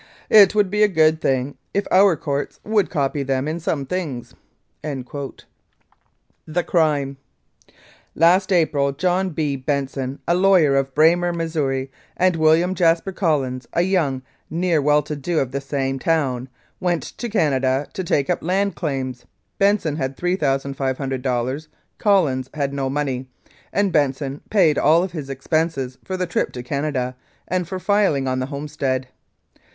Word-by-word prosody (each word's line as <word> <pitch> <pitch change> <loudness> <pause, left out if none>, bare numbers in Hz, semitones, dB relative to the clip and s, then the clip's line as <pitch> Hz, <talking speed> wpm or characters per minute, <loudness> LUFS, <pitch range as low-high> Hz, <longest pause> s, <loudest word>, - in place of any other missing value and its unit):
* - - -30
It 200 +1 +5
would 205 -3 +2
be 210 +1 +1
a 210 - +7
good 160 -4 +3
thing 135 +1 -1 0.2
if 200 - +1
our 190 -1 +6
courts 140 -1 -3
would 210 -2 +1
copy 140 -2 -1
them 135 0 -1
in 160 +2 -2
some 150 -3 -2
things.' 145 -7 -4 0.5
"THE 140 -4 -4 1.6
CRIME 145 -5 +1 1.0
"Last 180 +4 +4
April, 150 -6 +2
John 185 +4 0
P. 150 -3 0
Benson, 135 -1 -2
a 170 - +3
lawyer, 180 -6 +4
of 135 -1 0
Braymer, 175 +3 +4
Mo., 150 -6 -1 0.3
and 185 -1 +3
William 160 +3 +3
Jaspar 170 +1 +2
Collins, 140 -9 -1
a 170 - +2
young 160 -9 0 0.3
ne'er 170 0 +1
do - - 0
well, 150 0 +3 0.3
of 135 -4 0
the 140 +1 -3
same 135 -1 -2
town, 135 -5 0 0.3
went 175 -2 0
to 240 - -6
Canada 135 -8 +1
to 190 - -3
take 145 -5 +1
up - - 0
land 195 +4 0
claims. 130 -6 -3 0.3
Benson 195 -7 +2
had 130 -2 -3
$3,500. 135 -4 -1 0.3
Collins 150 - +2
had 140 -2 -1
no 135 -1 -1
money, 135 -2 -2 0.4
and 200 -1 +1
Ben 145 -3 +3
son 140 0 -6
paid 165 -8 +3
all 160 +4 +4
of 190 - -4
his 150 -5 -6
expenses 135 -2 -2
for 185 - -4
the 180 - -1
trip 175 - -1
to 125 - -6
Canada 130 -2 -2 0.3
and 180 -1 -1
for 185 0 -4
riling 195 -10 +2
on 130 0 0
the 130 - -2
homestead. 140 -3 -3
150 Hz, 150 wpm, -21 LUFS, 135-175 Hz, 1.6 s, a